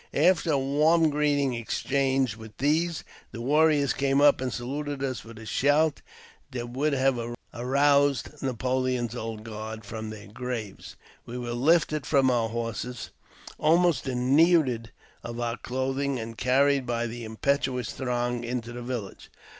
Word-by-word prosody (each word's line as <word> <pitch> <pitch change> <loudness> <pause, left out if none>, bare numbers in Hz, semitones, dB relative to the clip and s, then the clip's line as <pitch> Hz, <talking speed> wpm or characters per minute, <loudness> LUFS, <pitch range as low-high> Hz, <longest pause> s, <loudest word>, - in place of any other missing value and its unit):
After 170 +2 +3
a - - +3
warm 155 +4 +3
greeting 145 -2 +1
exchanged 130 +1 0
with 110 -1 -12
these, 160 +4 +1 0.3
the 115 - -8
warriors 145 +2 +3
came 135 0 +1
up, 145 -2 +5
and 130 -1 -1
saluted 140 +3 -4
us 130 -2 -3
with 115 -1 -12
a 115 - -10
shout 145 +6 +2 0.5
that 120 -3 -5
would 145 +4 0
have 135 -2 +2 0.3
aroused 140 +3 +2
Napoleon's 130 -2 -1
Old 110 -2 -5
Guard 110 0 -7
from 110 +1 -6
their 105 -1 -9
graves. 110 -1 -6 0.3
We 120 - -6
were 120 -1 -4
lifted 155 +2 +2
from 135 -3 +4
our 115 -2 +1
horses, 115 0 -4 0.3
and - - -13
almost 170 0 +3
denuded 130 -1 +3 0.3
of 120 0 -6
our 120 0 -2
clothing, 135 +2 -2
and 115 -1 -6
carried 135 +2 +2
by 120 -1 -1
the 120 +1 -6
impetuous 125 +2 -1
throng 120 -2 -2
into 120 0 -4
the 120 - -6
village. 120 -5 -6
130 Hz, 145 wpm, -27 LUFS, 120-140 Hz, 0.5 s, up